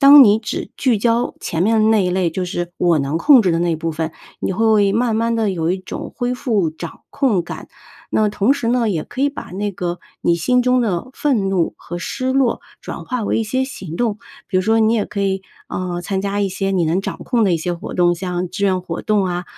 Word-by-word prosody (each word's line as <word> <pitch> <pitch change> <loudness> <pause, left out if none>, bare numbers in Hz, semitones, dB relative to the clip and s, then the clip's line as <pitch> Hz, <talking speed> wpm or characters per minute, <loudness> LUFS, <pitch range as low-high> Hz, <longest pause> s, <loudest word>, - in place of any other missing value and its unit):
当 280 0 +10
你 205 -2 +5
只 215 - -5
聚 245 -5 +2
焦 235 +2 +1
前 165 +1 -2
面 220 +1 +3
那 210 -3 +3
一 180 - 0
类， 180 -1 +1
就 180 +3 -3
是 175 -1 -4
我 170 -3 +3
能 140 +2 -1
控 280 - +7
制 185 -5 +2
的 165 - +1
那 170 -2 +1
部 165 +1 -3
分， 160 +1 -2 0.3
你 - - -1
会 215 -1 +3
慢 230 +1 +1
慢 230 +1 +1
地 220 -3 +1
有 165 -3 -1
一 185 - 0
种 185 - -7
恢 245 -1 -1
复 220 - 0
掌 160 +1 -9
控 250 -10 +1
感。 170 - -7 0.4
那 - - +2
么 210 - +3
同 210 +4 +2
时 280 -4 -3
呢， 235 -2 +2
也 165 -5 -2
可 255 - -7
以 285 - +4
把 285 - -7
那 205 +2 -2
个， 175 -2 -4 0.2
你 170 - +2
心 250 +10 +2
中 250 0 +3
的 210 -1 -1
愤 240 -10 +1
怒 185 -3 0
和 175 - -7
失 255 +8 -2
落 265 -3 +2 0.2
转 - - -7
化 250 -2 -2
为 205 - 0
一 225 - 0
些 260 +5 0
行 195 - -6
动， 215 +1 -1 0.3
比 185 - 0
如 - - +4
说， 220 +4 +2
你 220 0 +4
也 215 -3 +1
可 200 - -5
以， 195 -1 0 0.3
呃， 175 -1 -3
参 190 +2 -2
加 200 +1 -1
一 200 - +1
些 195 +1 -2
你 180 -3 +2
能 165 +4 +1
掌 - - -4
控 240 -3 +1
的 190 - +2
一 170 - +3
些 175 +2 -2
活 170 - -6
动， 175 -1 +3
像 180 0 -3
志 200 - -2
愿 190 -2 +2
活 175 -2 -5
动 210 -2 +2
啊， 180 -1 -2
200 Hz, 265 characters per minute, -19 LUFS, 175-230 Hz, 0.4 s, 当